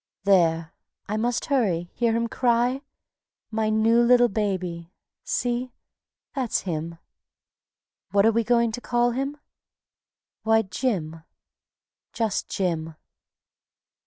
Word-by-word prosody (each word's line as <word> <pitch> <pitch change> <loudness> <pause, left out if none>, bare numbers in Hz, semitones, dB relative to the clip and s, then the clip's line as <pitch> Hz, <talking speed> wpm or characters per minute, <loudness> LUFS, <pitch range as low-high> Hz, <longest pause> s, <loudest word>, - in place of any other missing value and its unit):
There! 165 -4 +3 0.3
I 210 - -2
must 235 +2 0
hurry... 190 - 0
hear 235 -2 +1
him 235 0 0
cry? 245 +2 +1 0.7
My 220 0 0
new 220 +2 +4
little 245 0 +5
baby.... 185 -5 -3 0.3
See! 245 0 -2 0.6
that's 260 -5 -1
him. 165 -2 -4 1.1
What 200 0 +3
are 225 - +6
we 230 +1 +1
going 235 0 +2
to 245 +2 -6
call 240 0 +1
him? 275 +4 -3 1.0
Why, 225 0 +3
Jim, 185 -7 -2 0.9
just 225 -4 -1
Jim. 165 -4 -2
225 Hz, 105 wpm, -25 LUFS, 180-240 Hz, 1.1 s, are